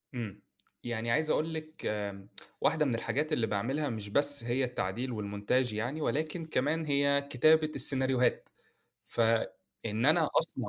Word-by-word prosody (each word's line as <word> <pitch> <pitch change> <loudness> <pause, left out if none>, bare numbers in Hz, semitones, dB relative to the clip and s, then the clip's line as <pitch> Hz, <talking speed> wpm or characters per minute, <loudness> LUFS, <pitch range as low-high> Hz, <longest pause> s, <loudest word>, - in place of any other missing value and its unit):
إمم، 105 -4 -8 0.4
يعني 115 -1 -5
عايز 155 +4 +2
أقول 160 +1 -2
لِك 155 0 -10
آآ 100 -2 -6 0.3
واحدة 155 -1 0
من 125 -5 -2
الحاجات 140 +8 -4
اللي 115 -6 -2
باعملها 130 +8 -4
مش 110 -3 -7
بس 145 +2 +7
هي 120 +3 -3
التعديل 125 0 -5
والmontage 105 +3 -3
يعني، 120 +9 -6
ولكن 155 +3 -4
كمان 155 +2 -3
هي 140 -1 0
كتابة 155 +4 +1
السيناريوهات، 130 -2 +6 0.6
فإن 115 -1 -4
أنا - - +2
أصنع - - +2
125 Hz, 140 wpm, -28 LUFS, 110-150 Hz, 0.6 s, بس